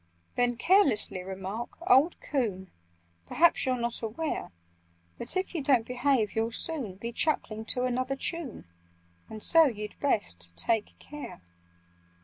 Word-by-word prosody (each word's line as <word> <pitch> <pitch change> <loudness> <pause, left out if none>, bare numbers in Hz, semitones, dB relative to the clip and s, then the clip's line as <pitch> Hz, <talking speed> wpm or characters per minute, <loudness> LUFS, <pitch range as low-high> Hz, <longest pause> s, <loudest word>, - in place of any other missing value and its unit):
"Then 245 0 +1
carelessly 255 - +3
remark 190 +5 -6
'Old 275 +7 +4
coon! 205 -10 -2 0.6
Perhaps 340 -4 +3
you're 255 -1 +1
not 235 0 -2
aware 235 - -3 0.7
That, 250 - -2
if 375 0 -2
you 330 - -2
don't 265 -5 +3
behave, 250 -3 +1
you'll 225 +1 0
soon 260 - +1
Be 230 +5 -5
chuckling 220 -6 -1
to 250 +2 0
another 255 +2 -1
tune— 315 -1 -4 0.6
And 215 -1 -6
so 330 -1 +6
you'd 210 -6 -4
best 85 - -1
take 225 - 0
care! 295 - -9
240 Hz, 130 wpm, -29 LUFS, 215-285 Hz, 0.7 s, so